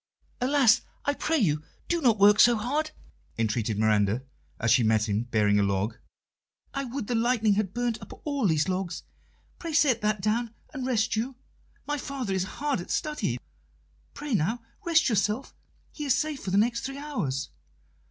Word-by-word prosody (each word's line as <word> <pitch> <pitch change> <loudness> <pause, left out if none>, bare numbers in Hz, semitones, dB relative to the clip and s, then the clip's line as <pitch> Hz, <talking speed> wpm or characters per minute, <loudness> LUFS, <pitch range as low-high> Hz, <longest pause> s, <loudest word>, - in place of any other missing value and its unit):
"Alas! 260 -4 +4 0.2
I 285 - +2
pray 320 +2 0
you, 155 - +2 0.3
do 340 -1 0
not 235 -6 +4
work 205 +1 +6
so 240 0 +7
hard," 290 +8 -1 0.5
entreated 110 -1 0
Miranda, 105 +2 +2 0.4
as 115 0 +2
she 120 - +6
met 110 -1 +2
him 105 +3 0
bearing 105 -3 +2
a - - +4
log. 100 +3 0 0.8
"I 275 -1 -2
would 255 -1 -4
the 245 - -2
lightning 225 -2 +2
had 200 -2 0
burnt 240 -1 -2
up - - -11
all 285 -7 +1
these 155 -2 +2
logs! 185 -2 -2 0.6
Pray 330 -2 -5
set 275 -7 +3
that 210 -1 +1
down 225 +3 -1 0.2
and 260 -3 -3
rest 230 -2 +1
you. 245 +4 -2 0.5
My 295 0 -2
father 260 -7 -3
is 190 -1 0
hard 290 -9 0
at - - -10
study: 305 -2 -1 0.8
pray, 295 -3 -4
now, 220 +6 0 0.2
rest 335 -2 +3
yourself; 215 +2 0 0.4
he 300 - -6
is 275 - +3
safe 305 -2 -1
for 195 - -3
the 190 - +2
next 235 +2 +2
three 270 +2 -5
hours." 215 - -3
220 Hz, 175 wpm, -27 LUFS, -, 0.8 s, so